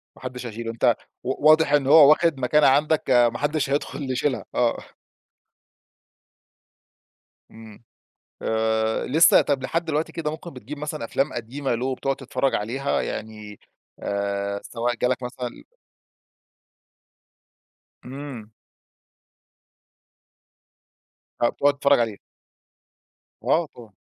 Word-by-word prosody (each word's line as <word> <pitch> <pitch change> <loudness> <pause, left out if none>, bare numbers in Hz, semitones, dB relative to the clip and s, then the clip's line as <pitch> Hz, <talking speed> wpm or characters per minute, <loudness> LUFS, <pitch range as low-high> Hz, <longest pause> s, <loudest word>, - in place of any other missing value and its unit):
ما - - -18
حدش 125 -1 -6
هيشيله 115 0 -5
أنت 115 0 +2 0.3
و 135 +4 +2
واضح 155 -2 +5
إن 145 -2 +3
هو 145 0 +8
واخد 155 -2 +3
مكانة 150 +4 +3
عندك 150 +3 +3 0.3
ما - - -4
حدش 145 -1 -1
هيدخل 140 -1 -2
يشيلها، 130 +1 -1
آه. 120 -1 +2 2.7
امم، 110 0 -14 0.6
آآ، 110 0 0
لسّه 160 +5 +6
طب 140 -3 -1
لحد 165 +5 -1
دلوقتي 160 +1 -2
كده 160 -2 -3
ممكن 160 +2 -8
بتجيب 130 +4 -9
مثلًا 150 -3 -5
أفلام 135 +4 -1
قديمة 120 +3 -3
له، 125 +3 -3
وبتقعد 135 +1 -1
تتفرّج 135 0 -1
عليها 130 +7 -1
يعني 105 -1 -7 0.4
آآ، 100 0 -2
سواء 120 +1 -2
جالك 125 +2 -1
مثلًا 125 0 -6 2.4
امم. 130 -5 -9 2.9
هتقعد 140 +4 +2
تتفرج 140 -1 +4
عليه. 110 -4 -2 1.2
آه، 170 - +2
طبعًا. 115 -5 -14
130 Hz, 105 wpm, -23 LUFS, 115-145 Hz, 2.9 s, هو